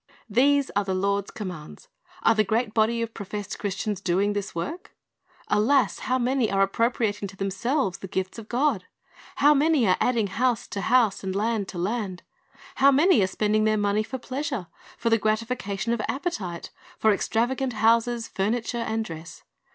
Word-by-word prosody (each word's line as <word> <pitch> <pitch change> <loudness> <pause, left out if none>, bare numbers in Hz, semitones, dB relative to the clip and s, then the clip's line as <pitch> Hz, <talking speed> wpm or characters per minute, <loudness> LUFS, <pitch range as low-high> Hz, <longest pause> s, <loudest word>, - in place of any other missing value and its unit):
"^ - - -26
These 275 +5 +3
are 205 - +2
the 190 -1 -2
Lord's 200 +1 0
commands. 180 - -8 0.4
Are 225 - +5
the 215 -1 +3
great 220 +2 0
body 230 +1 +2
of 230 0 -6
professed 205 0 -6
Christians 205 0 -3
doing 195 +2 +1
this 205 -2 -4
work? 300 - -5 0.5
Alas, 240 +2 +2
how 255 - +3
many 255 -1 +1
are 195 0 +3
ap 195 - -2
propriating 225 -3 0
to 190 0 -13
themselves 195 - -1
the 195 - -7
gifts 190 +4 -3
of 220 - -11
God! 245 -7 +1 0.5
How 295 +2 +5
many 295 -4 +3
are 185 - +3
adding" 235 -4 +2
house 235 +3 0
to 200 - -4
house 230 -4 +2
and 190 0 -3
land 215 -1 0
to 185 - -8
land. 195 0 -3 0.5
How 275 - +6
many 290 - +5
are 190 - +3
spending 215 +2 +1
their 215 - +3
m 205 -1 0
o - - +2
n 200 - 0
e - - +3
y - - +1
f 245 - -7
o - - -1
r - - -16
pleasure, 265 - -4 0.3
for 230 - -1
the 225 - +4
gratifica 215 -1 -1
tion 230 +4 -1
of 235 - -2
ap})etite, 215 - -4 0.3
for 220 -1 +4
extravagant 245 +5 0
houses, 230 +2 +2
furniture, 230 +4 -1
and 225 -1 -2
dress. 165 -2 -9
220 Hz, 200 wpm, -25 LUFS, 195-245 Hz, 0.5 s, How